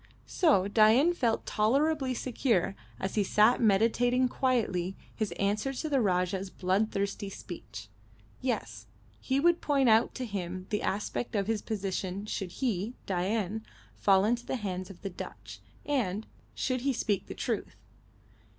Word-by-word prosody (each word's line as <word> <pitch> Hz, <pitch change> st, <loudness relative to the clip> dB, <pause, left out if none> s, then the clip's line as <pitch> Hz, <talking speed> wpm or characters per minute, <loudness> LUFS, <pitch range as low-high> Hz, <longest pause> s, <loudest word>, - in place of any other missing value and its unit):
So 280 Hz, -, +3 dB
Dain 225 Hz, +10 st, +5 dB
felt 235 Hz, -9 st, 0 dB
tolerably 265 Hz, +4 st, +1 dB
secure 230 Hz, -, 0 dB, 0.2 s
as 190 Hz, -, -3 dB
he 210 Hz, -, +2 dB
sat 215 Hz, +6 st, +4 dB
meditating 240 Hz, +4 st, +3 dB
quietly 210 Hz, -9 st, 0 dB, 0.2 s
his 215 Hz, -3 st, -2 dB
answer 210 Hz, +7 st, 0 dB
to 310 Hz, +4 st, -3 dB
the 275 Hz, -3 st, +2 dB
Rajah's 185 Hz, -1 st, 0 dB
bloodthirsty 200 Hz, +1 st, -1 dB
speech. 120 Hz, -, -9 dB, 0.5 s
Yes, 115 Hz, -, -3 dB, 0.3 s
he 265 Hz, +1 st, 0 dB
would 345 Hz, +3 st, +3 dB
point 275 Hz, -4 st, +3 dB
out 225 Hz, +1 st, +4 dB
to 255 Hz, -, -3 dB
him 185 Hz, -4 st, -4 dB
the 210 Hz, -, 0 dB
aspect 210 Hz, +3 st, -2 dB
of 200 Hz, -1 st, +1 dB
his 220 Hz, 0 st, -1 dB
position 195 Hz, -2 st, -3 dB
should 195 Hz, -3 st, -3 dB
he 230 Hz, -2 st, -2 dB
Dain 200 Hz, +3 st, -1 dB, 0.3 s
fall 195 Hz, -1 st, +4 dB
into 240 Hz, +2 st, +1 dB
the -, -, -3 dB
hands 185 Hz, -5 st, -4 dB
of 195 Hz, -, -11 dB
the 195 Hz, -, -3 dB
Dutch 100 Hz, -, -9 dB, 0.3 s
and 220 Hz, -8 st, -1 dB, 0.3 s
should 255 Hz, -2 st, -1 dB
he 275 Hz, +1 st, +1 dB
speak 210 Hz, -5 st, -1 dB
the -, -, -7 dB
truth. 230 Hz, -5 st, -3 dB
215 Hz, 145 wpm, -30 LUFS, 190-250 Hz, 0.5 s, Dain